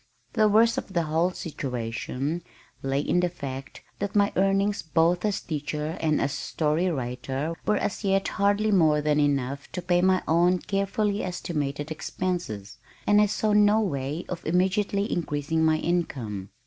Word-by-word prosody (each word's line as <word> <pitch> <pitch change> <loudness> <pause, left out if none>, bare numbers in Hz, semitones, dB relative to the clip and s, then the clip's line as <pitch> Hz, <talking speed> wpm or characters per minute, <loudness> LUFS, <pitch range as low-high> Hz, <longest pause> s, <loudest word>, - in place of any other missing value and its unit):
The 215 -1 +4
worst 225 +2 +4
of 190 - -10
the 170 -2 +2
whole 160 +3 +1
situation 135 0 -4 0.4
lay 135 +1 0
in 175 - +1
the 180 0 +2
fact 135 -5 -7 0.2
that 200 0 -3
my 205 -1 +3
earnings 195 +1 +2
both 165 +2 +2
as 205 -1 0
teacher 150 0 -3
and 155 -2 +2
as 135 - 0
story 160 +4 0
writer 135 +2 -3
were 210 - +3
as 210 - -2
yet 195 -1 +2
hardly 205 +2 +2
more 160 -6 +4
than 150 0 +1
enough 140 -1 0
to 180 - -3
pay 175 0 +2
my 185 0 +3
own 175 +3 +4
carefully 200 +2 -1
estimated 150 -5 -3
expenses, 155 - -4 0.3
and 205 0 +5
I 210 - +4
saw 210 +1 0
no 210 +1 +5
way 150 -4 -2
of 180 - -5
immediately 195 +4 +1
increasing 160 -1 -1
my 160 0 +4
income. 125 - -2
170 Hz, 160 wpm, -26 LUFS, 145-195 Hz, 0.4 s, and